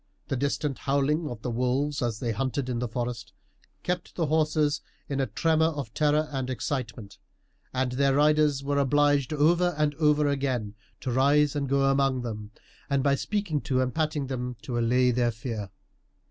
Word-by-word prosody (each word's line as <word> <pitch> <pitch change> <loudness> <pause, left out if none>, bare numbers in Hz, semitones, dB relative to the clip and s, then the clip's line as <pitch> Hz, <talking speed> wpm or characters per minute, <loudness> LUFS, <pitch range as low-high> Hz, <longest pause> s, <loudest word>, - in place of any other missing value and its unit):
The - - 0
distant 140 +1 -1
howling 145 +3 0
of 120 -3 -8
the 125 - -2
wolves, 130 +5 0
as 120 -3 -1
they 120 -3 -1
hunted 130 +3 -2
in 120 -2 -1
the 125 - -1
forest, 120 0 -4 0.5
kept 180 -1 -3
the 165 - 0
horses 155 -1 +1 0.3
in 140 -1 -2
a 135 - +1
tremor 160 -1 +2
of 145 -8 -4
terror 150 +1 +2
and 130 -2 -3
excitement, 115 -5 -4 0.5
and 130 -1 -1
their 135 +1 +2
riders 150 -1 +3
were 140 0 0
obliged 145 0 +2
over 170 +3 +3
and 150 -1 +1
over 150 -1 +3
again 130 -7 -1 0.3
to 130 - -2
rise 140 +3 +3
and 140 -2 -1
go 140 0 +2
among 135 -2 +2
them, 105 -3 -5 0.4
and 140 -2 +1
by 140 -1 +3
speaking 175 -1 -1
to 130 -1 0
and 130 -1 0
patting 155 -3 -1
them, 125 -1 -4
to 120 -2 -2
allay 125 +2 +3
their 120 0 +2
fear. 110 -3 -5
140 Hz, 175 wpm, -27 LUFS, 125-150 Hz, 0.5 s, riders